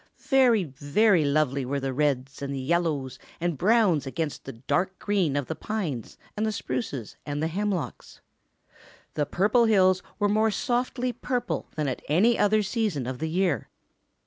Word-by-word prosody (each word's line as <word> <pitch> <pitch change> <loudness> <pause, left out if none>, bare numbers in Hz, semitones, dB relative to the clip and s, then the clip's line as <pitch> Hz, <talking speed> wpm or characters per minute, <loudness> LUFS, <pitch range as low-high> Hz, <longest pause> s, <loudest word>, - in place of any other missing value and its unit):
Very, 250 -6 +3
very 155 +6 +2
lovely 140 -2 +1
were 140 +3 -2
the 135 -1 -3
reds 135 -1 -1
and 140 0 -3
yellows 145 -3 -1 0.2
and 170 -1 -1
browns 185 - +3
against 155 +2 -4
the 135 - -6
dark 180 +11 -1
green 190 -9 0
of 145 -2 0
the 160 - -3
pines 160 - -4 0.2
and 210 - -1
the 220 - +1
spruces 130 - -4
and 145 0 -4
the 160 - 0
hemlocks. 190 0 -3 0.9
The 150 -2 -1
Purple 215 +6 +3
Hills 185 -4 +4 0.2
were 205 - +2
more 215 +2 +3
softly 245 +3 -1
purple 245 +1 -2
than 155 -2 -1
at 130 - -3
any 205 +10 +4
other 215 0 +3
season 200 - -1
of 125 0 -4
the 160 +1 -2
year. 175 -2 0
170 Hz, 160 wpm, -26 LUFS, 140-210 Hz, 0.9 s, Hills